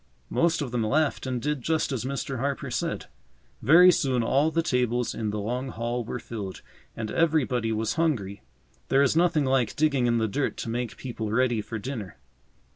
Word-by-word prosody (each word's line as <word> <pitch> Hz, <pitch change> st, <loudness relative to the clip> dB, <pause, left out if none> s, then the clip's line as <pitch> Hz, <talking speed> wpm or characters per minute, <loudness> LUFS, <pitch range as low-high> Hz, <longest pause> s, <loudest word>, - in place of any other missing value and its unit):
Most 165 Hz, -2 st, +2 dB
of 130 Hz, -, -5 dB
them 120 Hz, -2 st, 0 dB
laughed 145 Hz, +4 st, +1 dB
and 125 Hz, -1 st, -1 dB
did 150 Hz, +1 st, -2 dB
just 160 Hz, +3 st, 0 dB
as 130 Hz, -2 st, -2 dB
Mr. 135 Hz, -1 st, -3 dB
Harper 140 Hz, +2 st, -2 dB
said. -, -, -2 dB, 0.6 s
Very 175 Hz, +8 st, +8 dB
soon 130 Hz, -7 st, +1 dB
all 140 Hz, +6 st, +3 dB
the 165 Hz, +1 st, 0 dB
tables 125 Hz, -4 st, 0 dB
in 110 Hz, -2 st, -2 dB
the 105 Hz, -, -3 dB
long 125 Hz, +6 st, -3 dB
hall 120 Hz, +1 st, -3 dB
were 120 Hz, -, -4 dB
filled, 105 Hz, -6 st, -7 dB, 0.3 s
and 110 Hz, -1 st, -4 dB
everybody 130 Hz, -8 st, +1 dB
was 110 Hz, 0 st, -1 dB
hungry. 100 Hz, -12 st, -1 dB, 0.5 s
There 135 Hz, +1 st, +4 dB
is 140 Hz, -, +2 dB
nothing 165 Hz, -3 st, +3 dB
like 130 Hz, -4 st, +1 dB
digging 140 Hz, -5 st, +2 dB
in 120 Hz, 0 st, +2 dB
the 110 Hz, -1 st, +1 dB
dirt 135 Hz, +7 st, -2 dB
to -, -, -4 dB
make 120 Hz, -1 st, -3 dB
people 115 Hz, -4 st, -5 dB
ready 120 Hz, -1 st, +2 dB
for 110 Hz, +2 st, -6 dB
dinner. 105 Hz, -, -6 dB
125 Hz, 190 wpm, -26 LUFS, 115-140 Hz, 0.6 s, Very